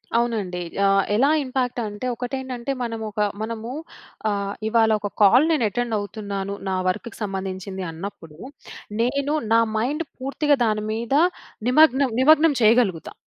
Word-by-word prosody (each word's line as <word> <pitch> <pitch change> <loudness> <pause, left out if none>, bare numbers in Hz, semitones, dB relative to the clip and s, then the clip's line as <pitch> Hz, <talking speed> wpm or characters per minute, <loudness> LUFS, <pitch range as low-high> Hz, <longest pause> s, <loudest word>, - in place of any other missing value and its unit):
అవునండి. 225 -6 0 0.3
ఆహ్! 195 0 +4
ఎలా 270 +6 +4
ఇంపాక్ట్ 255 -2 -2
అంటే 205 +3 -6
ఒకటేంటంటే 255 +1 -4
మనము 225 -2 -4
ఒక 210 - -7 0.2
మనము 225 +1 -4 0.6
ఆ! - - +1 0.4
ఇవాళ 225 0 +3
ఒక 205 - -4
కాల్ 235 +8 +6
నేను 300 -8 +2
అటెండ్ 240 +1 -2
అవుతున్నాను 200 -1 -5 0.2
నా 190 - 0
వర్క్‌కి 220 +5 -4
సంబంధించింది 190 -1 -4
అన్నప్పుడు. 165 -2 -9 0.6
నేను 280 +4 0 0.2
నా 230 - +6 0.2
మైండ్ 290 +9 -1
పూర్తిగా 280 +2 +1
దాని 215 -1 0
మీద 230 +3 -3 0.6
నిమగ్నం 275 -1 +5
నిమగ్నం 310 +2 +6
చేయగలుగుతా. 215 -6 +3
230 Hz, 130 wpm, -23 LUFS, 200-260 Hz, 0.6 s, కాల్